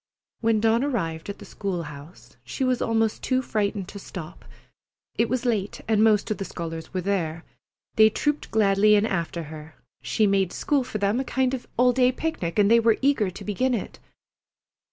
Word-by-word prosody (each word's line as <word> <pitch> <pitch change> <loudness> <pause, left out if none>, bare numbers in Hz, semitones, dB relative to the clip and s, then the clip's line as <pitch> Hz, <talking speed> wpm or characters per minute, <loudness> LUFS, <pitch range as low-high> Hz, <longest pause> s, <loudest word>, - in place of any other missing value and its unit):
When 225 -1 +2
Dawn 225 +3 +2
arrived 175 - -2
at 200 - -5
the - - -12
school 190 -4 -4
house 140 -5 -12
she 125 - -4
was 255 -1 +1
almost 225 -1 0
too 260 0 0
frightened 205 -4 -1
to 200 - -8
stop. 175 -4 -9 0.7
It 230 - +1
was 255 +1 -1
late, 210 -5 -1
and 220 -1 +3
most 215 -1 +3
of 210 - -2
the 195 - -3
scholars 165 -2 -6
were 185 - -2
there. 170 -4 -2 0.5
They 220 0 +7
trooped 295 +7 -1
gladly 210 -1 +4
in 205 +1 +3
after 170 -5 -2
her. 155 0 -10 0.3
She 220 - 0
had 205 - +4
made 195 -2 +1
school 285 -3 +1
for 245 -3 -5
them 200 +3 +1
a - - 0
kind 260 0 0
of 255 - -5
all 250 +1 +4
day 250 0 +4
picnic, 255 - -3
and 205 0 +4
they 235 - +7
were 230 -1 +3
eager 270 -8 +3
to 185 - -9
begin 250 +5 0
it. 215 - -6
210 Hz, 195 wpm, -25 LUFS, 185-235 Hz, 0.7 s, They